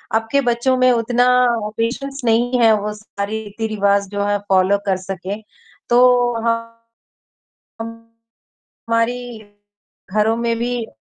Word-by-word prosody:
अब 225 0 0
के 280 0 +3
बच्चों 245 +1 +1
में 255 0 +4
उतना 245 +1 +2 0.5
पेशेंस 275 +4 -3
नहीं 240 +2 +2
है, 225 -1 +6
वो 210 +1 -4
सारी 210 0 -5
रीति-रिवाज़ 200 -2 0
जो 205 0 -2
है, 205 0 +1
फॉलो 190 +1 +4
कर 190 -2 +1
सकें, 190 +2 -6 0.5
तो 245 0 +4 1.3
हमारी 230 0 -13 1.7
घरों 220 +2 +2
में 235 0 -1
भी, 240 -1 -2
230 Hz, 115 wpm, -19 LUFS, 205-240 Hz, 1.7 s, है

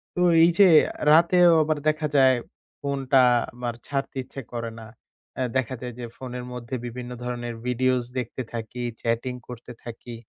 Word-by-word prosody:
তো 180 - -1 0.2
এই 170 - +6
যে 200 - +9 0.4
রাতেও 175 +2 +6
আবার 155 0 0
দেখা 155 0 +1
যায় 130 -2 +6 0.4
ফোনটা 135 -2 +2 0.3
আমার 120 -1 -4
ছাড়তে 140 -1 -3
ইচ্ছে 135 +2 -9
করে 115 -1 -4
না। 110 - -10 0.5
অ্যা 130 - -1
দেখা 130 0 -1
যায় 125 -1 -6
যে 120 - -4
ফোনের 125 -1 -6
মধ্যে 125 +1 -6
বিভিন্ন 120 +1 -7
ধরনের 120 -1 -4
videos 125 0 +1
দেখতে 125 +1 -5
থাকি, 115 +2 -5 0.2
chatting 120 +2 -1
করতে 125 0 -9
থাকি। 120 0 -9
125 Hz, 160 wpm, -25 LUFS, 120-135 Hz, 0.5 s, যে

